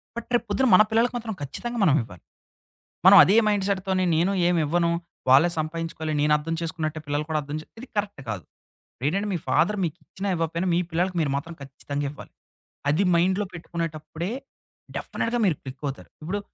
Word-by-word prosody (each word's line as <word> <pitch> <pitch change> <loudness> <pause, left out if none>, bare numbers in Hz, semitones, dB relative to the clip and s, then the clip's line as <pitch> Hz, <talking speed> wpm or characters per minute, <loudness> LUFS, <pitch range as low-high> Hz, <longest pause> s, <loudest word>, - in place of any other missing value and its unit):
But 235 - -6
రేపు 240 - +2
పొద్దున 265 - +2
మన 200 - +8
పిల్లలకి 230 +3 +2
మాత్రం 225 -2 -4
ఖచ్చితంగా 235 - -5
మనమివ్వాలి. 120 - +1 0.8
మనం - - +10
అదే 195 - +4
మైండ్ 205 -2 +1
సెట్‌తోని 190 -1 0
నేను 175 +5 +2 0.2
ఏమివ్వను. 170 0 +2 0.4
వాళ్ళే 140 +7 +7
సంపాదించుకోవాలి. 160 0 -3
నేను 150 +1 +3
అర్థం 165 +2 -3
చేసుకున్నట్టే, 160 -2 -3
పిల్లలు 145 +1 -1
కూడా 155 -1 +1
అర్థం 145 +1 -5
చే - - -15
ఇది 250 - -9
కరెక్ట్ 205 -7 -2
కాదు. 100 -5 -4 0.6
ఏంటంటే 195 +7 0
మీ 175 - 0
ఫాదర్ 210 +5 +2
మీకిచ్చినా 180 +4 -6
ఇవ్వపోయినా, 165 +2 -1
మీ - - +3
పిల్లలకి 180 +2 0
మీరు 145 -3 0
మాత్రం 165 +4 -6
ఖచ్చితంగివ్వాలి. 140 +1 -6 0.6
అది 155 +7 +3
మైండ్‌లో 185 +4 +2
పెట్టుకునేటప్పుడే, 165 +1 -5 0.7
డెఫినెట్‌గా 235 +1 -2
మీరు 165 - +2
క్లికవుతారు. 135 +1 -6
ఇప్పుడు 190 +6 -2
165 Hz, 155 wpm, -25 LUFS, 150-190 Hz, 0.8 s, మనం